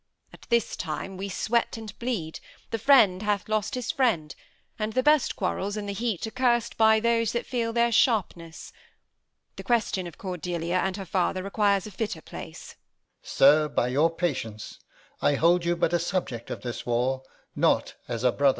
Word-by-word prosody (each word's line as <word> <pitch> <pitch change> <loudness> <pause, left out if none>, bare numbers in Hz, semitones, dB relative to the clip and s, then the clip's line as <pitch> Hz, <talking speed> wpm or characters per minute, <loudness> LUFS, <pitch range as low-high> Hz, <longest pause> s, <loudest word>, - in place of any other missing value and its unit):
At - - -16
this 235 -2 +1
time 170 +4 -5
We 195 +2 -5
sweat 230 +5 0
and 220 -2 -8
bleed: 215 -11 -3 0.3
the 225 - -2
friend 215 -7 +5
hath 205 -1 -1
lost 215 +3 -1
his 250 -3 -2
friend; 205 - 0 0.5
And 215 0 -2
the 255 - +1
best 300 -1 +3
quarrels, 200 +2 -2
in 210 - -4
the 200 - -4
heat, 220 -2 -2
are 220 - -6
curs'd 240 -1 +1
By 220 0 +5
those 230 -1 +1
that 235 - -2
feel 235 -3 -2
their 235 +1 +2
sharpness. 185 - 0 0.8
The - - -7
question 220 -6 0
of 170 - -11
Cordelia 175 -1 -3
and 190 +1 -1
her 195 - -6
father 185 0 -1
Requires 200 -1 +1
a 215 - -8
fitter 205 -3 -3
place. - - -9 0.5
Alb. - - -20
Sir, 150 +3 +5
by 125 - 0
your 145 +6 +3
patience, 130 - -4 0.4
I 145 - +3
hold 170 +4 +3
you 175 0 +2
but 170 - 0
a 175 - +3
subject 165 -9 -3
of - - -5
this 120 -2 -5
war, 125 +2 0 0.3
Not - - +2
as 120 -1 -4
a 125 - +4
brother. 140 +3 +3
195 Hz, 185 wpm, -26 LUFS, 165-225 Hz, 0.8 s, friend